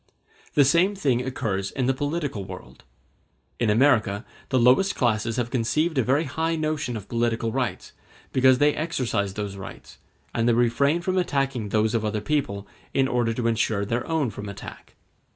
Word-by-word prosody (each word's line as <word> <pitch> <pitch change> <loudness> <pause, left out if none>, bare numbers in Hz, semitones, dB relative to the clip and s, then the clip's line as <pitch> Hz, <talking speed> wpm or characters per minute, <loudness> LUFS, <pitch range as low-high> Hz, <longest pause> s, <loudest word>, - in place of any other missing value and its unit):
The 145 - +6
same 175 +8 +3
thing 135 -10 +1
occurs 105 -7 -2
in 130 +3 -2
the 135 - +2
political 145 - -3
world. 95 -7 -11 0.7
In 115 - +1
America 110 -3 +3 0.2
the 130 - +2
lowest 130 +11 +4
classes 115 -1 0
have 120 -1 -2
conceived 155 +7 0
a - - +3
very 140 +6 +2
high 160 +3 -1
notion 155 -6 -2
of 100 - -9
political 115 -1 0
rights, 125 -1 -3 0.4
because 130 0 +5
they 145 +2 +4
exercise 125 - -2
those 100 -2 -4
rights; 95 - -10 0.3
and 115 0 +1
they - - +4
refrain 120 +7 +2
from 185 +1 0
attacking 135 - -1
those 110 +1 +1
of 115 -2 0
other 105 0 -1
people, 105 -8 -2 0.3
in 135 -1 +3
order 120 -3 +1
to 115 +1 -3
ensure 110 -3 +1
their 115 +4 -2
own 160 -7 0
from 105 +1 -7
attack. 100 - -10
125 Hz, 170 wpm, -25 LUFS, 110-145 Hz, 0.7 s, The